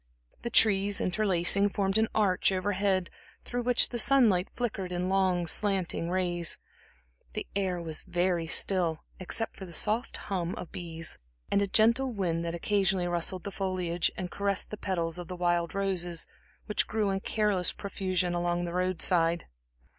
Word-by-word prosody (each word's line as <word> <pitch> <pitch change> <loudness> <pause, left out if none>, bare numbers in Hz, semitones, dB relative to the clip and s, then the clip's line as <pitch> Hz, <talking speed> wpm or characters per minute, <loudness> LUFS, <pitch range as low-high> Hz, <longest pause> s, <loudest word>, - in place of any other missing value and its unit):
The 235 - -3
trees 205 -3 +4
interlacing, 195 0 +2
formed 195 +1 0
an 220 - +2
arch 195 -3 +2
over 190 +2 -1
head, 190 -2 0 0.3
through 245 0 -3
which 245 0 +4
the 240 - -4
sunlight 220 -8 +4
flickered 205 -7 -3
in 180 +1 -2
long, 185 -2 +1
slanting 185 -2 0
rays; 175 -2 0 0.8
the - - -4
air 190 -3 -1
was 160 -2 -2
very 175 -2 0
still, 170 -2 +2 0.2
except 225 +5 -2
for 190 - -8
the 170 - -11
soft 220 - +1
hum 180 -3 -3
of 175 - -8
bees, 165 -2 -4 0.3
and 200 - +3
a 200 - +1
gentle 235 +6 +3
wind 175 -6 -1
that 170 0 -3
occasionally 190 0 +1
rustled 175 +1 +1
the 200 - -5
foliage 185 -3 -1
and 180 -1 -4
caressed 200 -1 0
the - - -3
petals 175 -4 -2
of 175 - -7
the 180 - -6
wild 175 0 0
roses, 180 -4 -1 0.4
which 210 - +1
grew 215 -2 0
in 195 - -1
careless 200 -4 +1
profusion 185 -3 -2
along 175 0 -1
the 170 - -5
road 185 0 0
side. 170 -2 +3
185 Hz, 165 wpm, -29 LUFS, 175-200 Hz, 0.8 s, trees